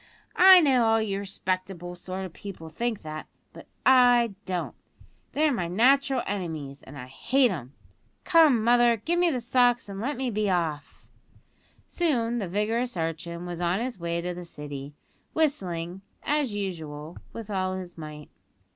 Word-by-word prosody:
I 375 0 +9
know 265 -6 +4
all 225 0 +4
you 200 -3 -1
respectable 185 -2 -4
sort 185 +2 -6
of 180 - -9
people 185 -5 -9
think 230 +6 -3
that; 155 0 -7 0.3
but - - -12 0.2
I 245 -3 +5
don't. 180 -2 -2 0.6
They're 300 -1 +2
my 180 -8 -1
natural 260 +7 +3
enemies, 160 -8 -4
and 140 +2 -12
I 125 - -7
hate 245 - +2
'em. 140 -6 -7 0.5
Come, 315 -10 +5
mother, 240 0 +4
give 340 +11 -1
me 355 -1 +4
the 260 -6 -1
socks 245 0 +2
and 195 0 -6
let 280 +4 -2
me 260 -1 -2
be 210 -1 0
off." 160 -5 -2 0.8
Soon 240 -9 0
the 200 - -3
vigorous 220 +4 -1
urchin 170 +1 -4
was 175 -1 -5
on 175 +3 +1
his 240 -4 -4
way 170 0 -2
to 180 +1 -3
the 175 0 -7
City, 145 -3 -8 0.4
whistling, 185 - -1 0.2
as 295 -4 0
usual, 165 -6 -5
with 225 -2 -8
all 185 -1 -1
his 180 -2 -7
might. 150 -2 -9
195 Hz, 160 wpm, -27 LUFS, 170-245 Hz, 0.8 s, I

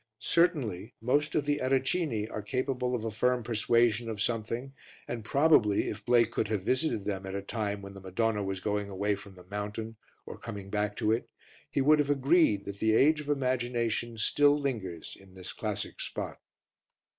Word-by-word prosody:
Certainly 125 - +1
most 145 +6 +1
of 145 - +1
the 145 0 +1
Ericini 130 -3 +1
are 105 - -4
capable 125 +3 -1
of 115 -2 -3
a 110 - -2
firm 125 +3 +1
persuasion 115 0 +2
of 110 -2 -4
something 115 +4 -2 0.3
and 115 -2 -4
probably, 130 -5 +4
if 105 -1 -6
Blake 120 0 +4
could - - 0
have 105 -3 -1
visited 130 -3 0
them 100 -2 -2
at 95 - -4
a 100 - -2
time 105 -2 -3
when 100 0 -8
the 100 - -10
Madonna 105 +3 0
was 95 -1 -3
going 105 +1 -2
away 100 +2 0
from 100 -1 -9
the 90 - -14
mountain 105 +3 -5 0.3
or - - -9
coming 100 -4 -7
back 105 -1 0
to 105 - +1
it, 115 +2 -1 0.4
he 140 - 0
would 150 +3 +5
have 145 -1 +1
agreed 140 - +3
that 100 0 -7
the 110 0 +3
age 150 +5 +4
of 145 - -9
imagination 120 -4 0
still 145 +6 +4
lingers 105 - -4
in 95 -1 -18
this 95 -1 -7
classic - - -4
spot. - - -4
115 Hz, 185 wpm, -30 LUFS, 105-130 Hz, 0.4 s, would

